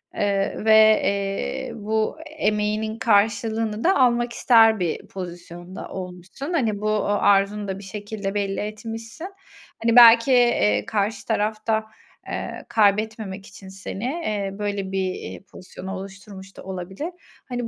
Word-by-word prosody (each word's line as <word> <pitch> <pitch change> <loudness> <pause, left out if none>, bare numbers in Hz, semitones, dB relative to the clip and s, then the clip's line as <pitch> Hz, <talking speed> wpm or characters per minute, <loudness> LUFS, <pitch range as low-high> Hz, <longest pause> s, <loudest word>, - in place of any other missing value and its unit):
eee, 200 -1 0
ve, 220 0 +6
eee, 195 0 -2
bu 220 +5 -1 0.2
emeğinin 215 -1 -1
karşılığını 220 0 +1
da 380 - +4
almak 240 -2 +2
ister 225 -4 +5
bir 170 -3 -2
pozisyonda 175 0 -8
olmuşsun. 185 - -7
Hani, 220 -9 0
bu, 215 - 0
ııı, 205 -1 +1
arzunu 200 +1 +2
da 190 0 -4
bir - - -11
şekilde 205 0 -5
belli 200 -1 -1
etmişsin. 225 - -6 0.6
Hani, 230 0 +3
belki, 235 +1 +8
eee, 105 - +3
karşı 210 0 -2
taraf 215 +1 -1
da, 220 0 +2 0.4
eee, - - -5
kaybetmemek 210 -2 +1
için 190 0 -13
seni, 195 +1 -7
eee, 215 -9 -2
böyle 200 -2 -3
bir, 190 -1 -1
eee, - - -8
pozisyonu 185 +1 -9
oluşturmuş 195 0 -10
da - - -10
olabilir. 190 - -5 0.4
Hani, 245 -1 -3
210 Hz, 135 wpm, -23 LUFS, 195-225 Hz, 0.6 s, belki